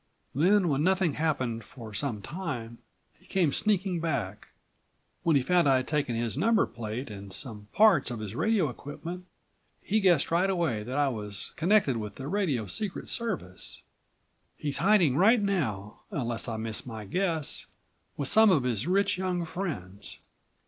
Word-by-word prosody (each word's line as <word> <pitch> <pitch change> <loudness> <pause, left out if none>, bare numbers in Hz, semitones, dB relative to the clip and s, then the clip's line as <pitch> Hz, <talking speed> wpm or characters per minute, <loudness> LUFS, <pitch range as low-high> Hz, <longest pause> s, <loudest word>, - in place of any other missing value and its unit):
Then, 180 +7 +4
when 145 0 +1
nothing 185 -3 +2
happened 130 -8 -1
for 110 -1 -11
some 110 -3 -2
time, 130 -9 -5 0.4
he - - -23
came 170 -7 +1
sneaking 195 -4 +1
back. 120 - -3 0.7
When 165 -2 +3
he 135 - +3
found 175 0 +3
I'd 130 -1 +3
taken 145 -6 0
his 115 -1 -1
number 220 +9 +3
plate 115 +2 -6
and 100 -1 -9
some 105 +1 -6
parts 210 - +5
of 120 -2 -5
his 105 -2 -5
radio 205 - +2
equipment, 165 +7 -7 0.5
he 215 +2 0
guessed 175 -8 +3
right 180 +3 +3
away 165 - 0
that 125 +6 -4
I 145 -1 +3
was 105 -4 -5
connected 170 - +3
with 105 -2 -5
the 135 - -6
radio 155 - 0
secret 190 - -4
service. 180 - -3 0.7
He's 145 -2 -2
hiding 175 -8 +4
right 225 +7 +6
now, 130 - -2
unless 120 -4 -3
I 115 -2 -3
miss 110 -1 -3
my 110 -4 -7
guess, 165 - -1 0.5
with 140 - -1
some 220 +5 +6
of 160 -9 +4
his 125 +1 -1
rich 195 +1 +2
young 180 -2 -1
friends. 105 - -5
145 Hz, 160 wpm, -28 LUFS, 115-185 Hz, 0.7 s, right